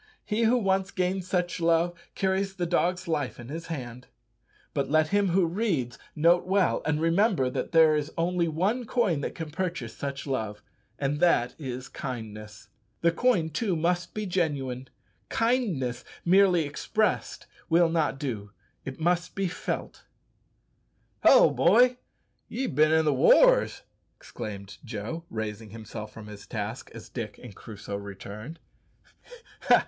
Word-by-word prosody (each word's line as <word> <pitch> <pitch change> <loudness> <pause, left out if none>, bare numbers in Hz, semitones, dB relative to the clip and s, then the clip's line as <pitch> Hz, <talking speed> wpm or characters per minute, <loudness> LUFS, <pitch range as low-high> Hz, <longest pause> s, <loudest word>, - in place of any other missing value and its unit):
He 225 +2 +1
who 240 +3 +4
once 195 -3 +1
gains 185 0 -1
such 180 -1 -1
love 170 +1 +2 0.2
carries 190 0 0
the 180 -2 -1
dog's 180 +1 0
life 145 -7 -2
in 120 +1 -9
his 165 +3 -6
hand. 125 -6 -6 0.7
But 140 -2 -1
let 155 +1 +3
him 205 0 +2
who 180 0 +3
reads 165 - -1 0.2
note 170 +3 +4
well, 190 -1 +2
and 155 -1 +1
remember 165 - +2
that 130 - -3
there 160 -2 +6
is 150 0 -2
only 170 0 +1
one 195 +10 0
coin 205 - +1
that - - -4
can 160 -2 -6
purchase 165 -8 -3
such 140 -1 -5
love, 110 -6 -3 0.3
and 145 +1 -1
that 140 -9 +3
is 130 -3 -5
kindness. 110 -5 -7 0.3
The 170 - +4
coin, 170 -5 +2
too, 195 +3 0
must 175 +2 -1
be 215 0 -2
genuine. 140 -8 -1 0.4
Kindness 190 - 0 0.2
merely 180 -1 +5
expressed 210 +9 -1 0.2
will 170 +1 +5
not 160 -4 0
do, 115 -8 -4 0.3
it 135 +2 -7
must 175 +2 0
be 195 -1 0
felt. - - -5 1.2
"Hallo, - - +7
boy, 245 +8 +4 0.5
ye've 260 - -3
bin 155 +3 +4
i' 160 0 +4
the 150 -2 +2
wars!" - - +5 0.3
exclaimed 100 - -8
Joe, 120 +8 -5
raising 110 -1 -5
himself 110 0 -8
from 110 0 -10
his 105 -1 -11
task 110 +1 -5
as 115 - -9
Dick 115 -4 -6
and 115 -6 -10
Crusoe 100 -2 -7
returned. 100 - -8
160 Hz, 145 wpm, -27 LUFS, 125-185 Hz, 1.2 s, Hallo